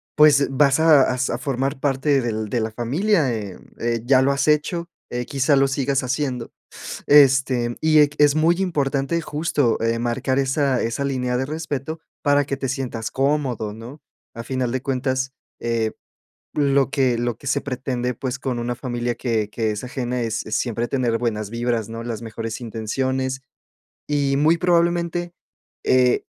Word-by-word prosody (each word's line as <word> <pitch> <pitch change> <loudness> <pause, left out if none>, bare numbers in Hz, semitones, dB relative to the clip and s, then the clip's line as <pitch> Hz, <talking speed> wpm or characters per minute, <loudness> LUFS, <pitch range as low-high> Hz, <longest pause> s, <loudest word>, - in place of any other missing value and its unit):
pues, 150 -2 +6
vas 140 +1 +3
a 155 -4 +5
a - - -3
sa 125 -2 0
formar 135 0 -2
parte 140 0 +1
del 110 -3 -3
de 120 - 0
la 110 - -1
familia, 140 - +1
eh 105 -4 -5 0.2
eh, 115 -1 -1
ya 130 +1 +5
lo 140 - +3
has 140 - 0
hecho, 160 +3 +1 0.2
eh, 125 0 -2
quizá 140 +2 +2
lo 135 0 +4
sigas 135 0 0
haciendo. 130 -2 -2 0.6
Este, 135 -4 +4
y 155 -1 +5
ec 145 -1 +4
es 145 -1 +6
muy 160 +2 +3
importante 145 -2 0
justo, 150 -5 0
eh, 115 0 0
marcar 130 +3 0
esa 135 -1 +1
esa 115 +5 -2
línea 125 -2 -1
de 130 - -1
respeto 155 0 -4 0.2
para 145 -1 +3
que 140 0 -3
te 135 - -3
sientas 125 -5 -3
cómodo, 135 -6 0
¿no? 120 +7 -10 0.3
A 115 - -5
final 130 -1 -2
de 130 0 -2
cuentas, 130 0 -1 0.3
eh, 115 -2 0 0.7
lo 140 -2 +3
que 130 -4 +1
lo 120 -1 -1
que 140 - -15
se 140 - +1
pretende, 125 -2 -3
pues, 130 +2 -4
con 130 -2 -3
una 120 +1 -2
familia 120 -1 -2
que 110 -4 -1
que 110 0 -1
es 105 +3 -5
ajena 125 -1 -3
es 115 -1 -2
es 110 - -1
siempre 120 -1 -1
tener 120 -4 0
buenas 110 -3 -2
vibras, 115 -1 -1
¿no? 115 0 -6
Las 115 -1 -5
mejores 115 0 -5
intenciones. 130 +4 -2 0.7
Y 140 -2 +1
muy 155 +3 +4
probablemente, 175 0 +1 0.5
eh, 125 -1 +3
130 Hz, 170 wpm, -22 LUFS, 120-145 Hz, 0.7 s, pues